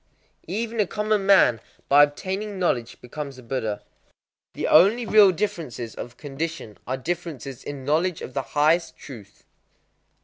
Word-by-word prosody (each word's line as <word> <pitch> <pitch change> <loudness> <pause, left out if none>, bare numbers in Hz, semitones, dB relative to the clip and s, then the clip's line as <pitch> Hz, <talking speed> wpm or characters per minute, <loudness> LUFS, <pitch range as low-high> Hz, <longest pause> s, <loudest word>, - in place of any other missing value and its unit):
_ - - -45 0.4
Even 225 +5 -3
a 205 - +3
common 210 -1 -1
man 125 - +5 0.3
by 145 +1 +6
obtaining 190 +8 -1
knowledge 125 -11 -1
becomes 140 +2 -7
a 130 - -12
Buddha. 110 -4 -3 0.7
The - - -3
only 230 +6 +5
real 210 -3 +6
differences 165 - -4
of 120 0 -9
condition 145 -6 -6
are 130 +1 -2
differences 145 -4 -5
in 140 -2 -7
knowledge 160 +4 0
of 130 - -8
the 135 - -1 0.2
highest 160 +2 +2
truth. 105 -8 -12
155 Hz, 145 wpm, -24 LUFS, 130-190 Hz, 0.7 s, by